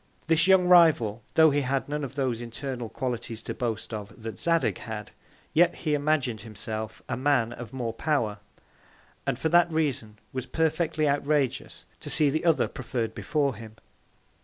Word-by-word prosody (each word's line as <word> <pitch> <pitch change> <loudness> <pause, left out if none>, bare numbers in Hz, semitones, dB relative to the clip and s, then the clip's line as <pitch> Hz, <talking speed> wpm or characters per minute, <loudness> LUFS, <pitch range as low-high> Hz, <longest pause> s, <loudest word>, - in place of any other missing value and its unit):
This 165 +2 +3
young 190 -1 +6
Rival, 155 - +5
tho' 160 -1 +7
he 145 +1 +1
had 135 0 -1
none 150 +1 -3
of 135 0 -6
those 130 -4 -1
internal 120 0 -5
Qualities 120 -3 -4
to - - -4
boast 115 -2 -3
of 105 +1 -7
that 110 -1 -6
Zadig 165 -1 +1
had, 105 -2 -7 0.4
yet 175 +2 +4
he 155 -3 -2
imagin'd 145 -6 0
himself 110 -2 -6
a - - -2
Man 125 -3 +1
of 120 -3 -9
more 120 -4 -3
Power; 115 -6 -1 0.9
and 135 -3 0
for 160 +5 0
that 175 0 +4
Reason, 135 -9 -1 0.2
was 130 -1 -4
perfectly 160 -1 0
outrageous 145 -1 0
to - - -8
see 150 -2 +3
the 155 +4 -1
other 165 -2 +3
preferr'd 120 -3 -4
before 145 0 0
him. 110 0 -11
135 Hz, 165 wpm, -27 LUFS, 115-155 Hz, 0.9 s, tho